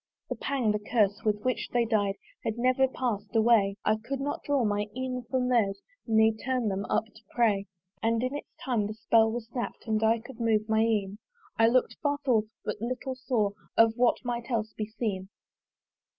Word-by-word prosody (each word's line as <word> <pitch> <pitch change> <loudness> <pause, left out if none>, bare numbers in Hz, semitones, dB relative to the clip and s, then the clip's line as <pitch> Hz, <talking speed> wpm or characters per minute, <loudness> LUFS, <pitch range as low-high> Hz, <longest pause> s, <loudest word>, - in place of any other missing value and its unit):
The - - -2
pang, 260 -6 0
the 210 - 0
curse, 210 -2 +1
with 210 -1 0
which 245 -4 -1
they 240 -1 +2
died, 205 -3 +1 0.3
Had 225 0 -2
never 255 +2 +3
pass'd 230 -5 -3
away: 220 -3 +4
I 215 +1 +3
could 275 +3 -3
not 285 +1 -3
draw 280 -4 +1
my 205 0 0
een 255 -1 -2
from 250 0 +1
theirs 210 -6 +2 0.3
Ne 220 0 +4
turn 255 -4 0
them 195 +1 -2
up - - +1
to 220 0 -19
pray. 210 -5 +1 0.3
And 230 +1 +1
in 255 +2 -1
its 290 - -6 0.2
time 230 -6 +1
the 215 - -6
spell 220 +1 +3
was 230 0 -4
snapt, 240 0 -5
And 220 -1 0
I 225 +1 +4
could 245 +2 -12
move 220 -2 +2
my 220 0 +2
een: 210 -3 0 0.4
I 225 - +6
look'd 250 +2 +2
far 290 -1 +1
forth, 225 -5 +3 0.2
but 210 0 -3
little 255 +2 -3
saw 245 -5 0 0.3
Of 225 0 +6
what 245 +1 +2
might 240 0 -3
else 220 -3 -1
be 215 - -4
seen. 210 -4 -3
225 Hz, 195 wpm, -28 LUFS, 215-250 Hz, 0.4 s, I